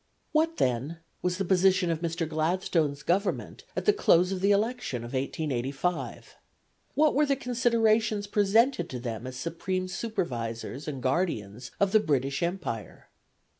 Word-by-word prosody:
What, 325 +1 +2
then, 130 +6 0 0.2
was 180 0 0
the 195 - -1
position 185 -1 +3
of 165 - -1
Mr. 165 -1 -1
Gladstone's 155 -2 0
Government 190 +6 -1
at - - -2
the 420 - +5
close 180 - +4
of 190 -1 -2
the 200 - +3
election 205 - 0
of 120 - -8
1885? 135 +3 -2 0.6
What 305 0 +4
were 295 +2 +3
the 275 - +3
considerations 230 -4 +2
presented 205 0 +2
to 125 - -5
them 120 -1 -5
as 130 - -7
supreme 175 +6 -3
supervisors 140 - -4
and 135 -4 -5
guardians 125 - -1
of 200 -1 +3
the 215 - +6
British 140 -6 0
Empire? 170 - -4
175 Hz, 145 wpm, -28 LUFS, 135-205 Hz, 0.6 s, the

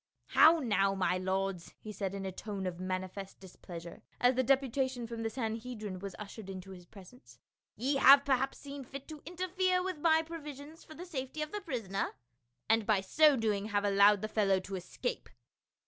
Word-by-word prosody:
" - - -49
How 330 +1 +9
now, 200 -8 +1
my 185 -1 +1
lords," 190 -1 -2
he 215 - -8
said 200 -2 -4
in 195 -1 -5
a 190 - -3
tone 200 0 -5
of 180 -1 -4
mani 185 0 -2
fest 195 +1 -9
displeasure, 175 -2 -10 0.2
as 245 +1 +4
the 260 - +2
deputation 260 -1 +1
from 230 0 -6
the 225 - -1
Sanhedrim 220 -4 -4
was 195 -1 -7
ushered 210 -1 -9
into 190 0 -8
his 180 -2 -12
presence. 200 +7 -15 0.4
"Ye 275 +4 0
have 275 +1 +8
perhaps 270 -1 +1
seen 280 -1 -8
fit 275 +2 -9
to 305 -2 -9
interfere 365 +1 0
with 370 -4 -4
my 320 0 +4
provisions 305 -1 -9
for 315 - -13
the 355 - -8
safety 305 -2 -4
of 305 - -7
the 415 - -4
prisoner, 225 - -3 0.5
and 225 -1 +2
by 210 -3 +3
so 300 +9 +5
doing 210 -3 0
have 205 -1 0
allowed 200 0 +5
the - - 0
fel 215 -1 0
low 190 -1 +4
to 195 +1 -6
escape." 190 - -4
225 Hz, 195 wpm, -32 LUFS, 195-280 Hz, 0.5 s, How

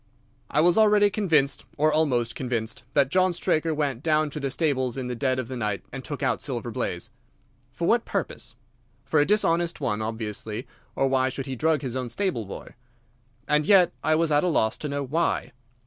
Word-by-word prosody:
"I 150 - +2
was 175 +5 +4
already 210 -1 +5
convinced, 160 -10 +1
or 155 +1 +3
almost 125 -7 +1
convinced, 115 -3 -3
that 140 -2 +3
John 185 +1 +3
Straker 165 -1 +1
went 145 -5 -1
down 155 -1 +1
to 150 - -4
the 140 -1 -2
stables 130 -4 0
in 130 - -3
the 125 0 -3
dead 130 +1 0
of 130 -3 -3
the 130 - -6
night 105 -4 -2
and - - -7
took - - -5
out - - +1
Silver - - -3
Blaze. - - -3 0.6
For - - -3
what - - +3
purpose? - - -4 0.5
For 155 - +2
a 145 - +3
dishonest 175 -5 +2
one, 105 -1 -1
obviously, 110 +1 -4 0.3
or 135 - +2
why 130 -1 +2
should 135 +1 -5
he 135 - -4
drug 155 +2 +1
his 130 -2 -3
own 130 -2 -3
stable 145 - -1
boy? 95 - -9 0.7
And 150 0 +3
yet 185 +1 +5
I 155 - +3
was 165 0 +1
at 145 0 +3
a - - +2
loss 110 -10 +2
to 150 - -5
know 140 0 -2
why. 145 -2 -1
140 Hz, 200 wpm, -25 LUFS, 125-160 Hz, 0.7 s, already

